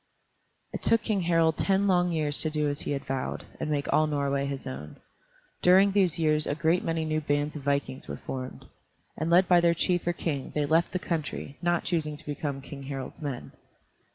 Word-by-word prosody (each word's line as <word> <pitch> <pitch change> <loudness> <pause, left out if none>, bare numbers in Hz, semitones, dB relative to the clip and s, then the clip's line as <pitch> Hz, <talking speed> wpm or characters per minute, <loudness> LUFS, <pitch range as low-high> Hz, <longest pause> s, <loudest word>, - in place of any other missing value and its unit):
It - - -4
took 230 -1 +3
King 210 -4 0
Harald 165 -2 +2
ten 195 0 +2
long 180 -2 +3
years 150 -3 +1
to 155 - 0
do 150 -1 0
as 145 0 -2
he - - -4
had 140 - -4
vowed, 135 -1 -3
and - - -2
make 145 -2 -1
all 155 - +4
Norway 140 -2 0
his 140 -1 -5
own. 75 +3 -7 0.7
During 190 +2 +6
these 190 -5 +2
years 155 -2 +2
a 145 - 0
great 165 +3 +2
many 165 -1 -1
new 155 0 0
bands 145 0 0
of 150 - -5
vikings 140 -1 -1
were - - -5
formed, 130 -1 -6 0.5
and 160 +2 -2
led 180 +2 +5
by 175 -1 +6
their 170 0 +4
chief 175 0 0
or 175 - +2
king 145 -5 -3
they 150 -1 +1
left 165 +3 +2
the - - -1
country, 155 -5 -4
not 175 -1 +1
choosing 155 -4 -1
to - - -15
become 145 -2 -3
King 140 0 -9
Harald's 135 +2 -6
men. 140 -5 -5
155 Hz, 210 wpm, -28 LUFS, 140-170 Hz, 0.7 s, During